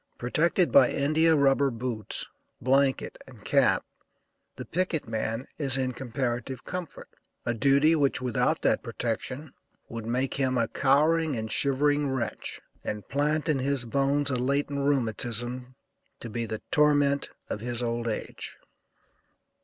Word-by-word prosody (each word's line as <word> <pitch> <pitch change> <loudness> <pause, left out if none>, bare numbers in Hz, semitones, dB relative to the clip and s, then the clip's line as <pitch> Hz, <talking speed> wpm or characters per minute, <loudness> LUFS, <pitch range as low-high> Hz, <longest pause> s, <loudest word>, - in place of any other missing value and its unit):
Protected 165 +8 +1
by - - +7
India 155 +3 +3
rubber 140 -1 +3
boots, 115 -3 -3 0.3
blanket 135 +1 +1
and - - -15
cap, - - +3 0.7
the - - -7
picket 175 -4 -1
man 115 +2 -2
is 135 -3 +1
in 130 -1 0
comparative 125 0 -3
comfort; 180 -3 -6 0.4
a 120 - +1
duty 140 +6 +4
which, 140 -3 +1
without 125 -2 0
that - - +2
protection, 130 +5 -4 0.4
would 115 -1 -6
make 125 +2 0
him 130 -2 0
a 115 -1 +2
cowering 155 +2 +2
and 110 -1 -4
shivering 145 +1 +2
wretch, 130 -2 -3 0.2
and 105 -1 -5
plant 150 +2 0
in 150 -4 +2
his 135 -1 0
bones 140 +3 +1
a - - 0
latent 140 +3 0
rheumatism, 125 -1 0 0.4
to 115 - -8
be 115 +1 -3
the 110 0 -5
torment 145 -1 +3 0.2
of - - -4
his 120 +1 -3
old 120 0 -2
age. 110 - -5
135 Hz, 135 wpm, -27 LUFS, 120-145 Hz, 0.7 s, by